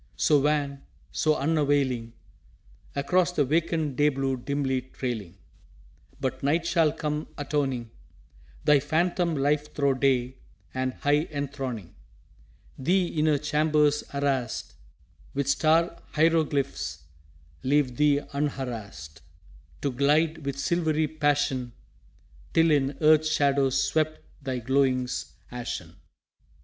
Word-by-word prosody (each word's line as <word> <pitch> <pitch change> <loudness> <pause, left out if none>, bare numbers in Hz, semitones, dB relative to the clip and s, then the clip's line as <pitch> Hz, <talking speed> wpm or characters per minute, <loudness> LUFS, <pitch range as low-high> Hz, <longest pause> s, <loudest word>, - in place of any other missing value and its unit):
So 150 -2 +4
wan, 140 -1 0 0.3
so 155 - +2
unavailing, 140 -6 +1 0.8
Across 175 +5 +2
the 145 -4 +2
vacant 155 -1 0
day 150 0 +5
blue 135 -1 -1
dimly 135 0 -1
trailing! 115 -8 -5 0.8
But 130 -2 -3
Night 160 +5 +1
shall 165 -3 +3
come 150 -1 -3
atoning 135 -5 -2 0.7
Thy 150 -1 +5
phantom 170 +3 0
life 145 +1 0
thro' 140 -2 +2
day, 130 -1 +1 0.4
and 130 0 -2
high 145 +2 +1
enthroning 135 - -5 0.9
Thee 180 +5 +2
in 155 0 0
her 150 -2 +4
chambers 150 0 +2
arrased 140 -3 -1 0.6
With 140 -1 -1
star 165 +4 +2
hieroglyphs, 140 - +1 0.6
leave 135 -2 +1
thee 145 -1 +3
unharassed 115 - -4 0.6
To 140 - +1
glide 150 +4 +2
with 140 -1 -3
silvery 160 -1 +1
passion, 145 -5 0 0.8
Till 165 0 +5
in 140 -1 +1
earth's 155 0 +5
shadow 140 -2 +3
swept 155 +4 0 0.2
thy 130 -2 -3
glowings 130 0 0 0.2
ashen. 120 -1 -5
145 Hz, 110 wpm, -27 LUFS, 130-155 Hz, 0.9 s, day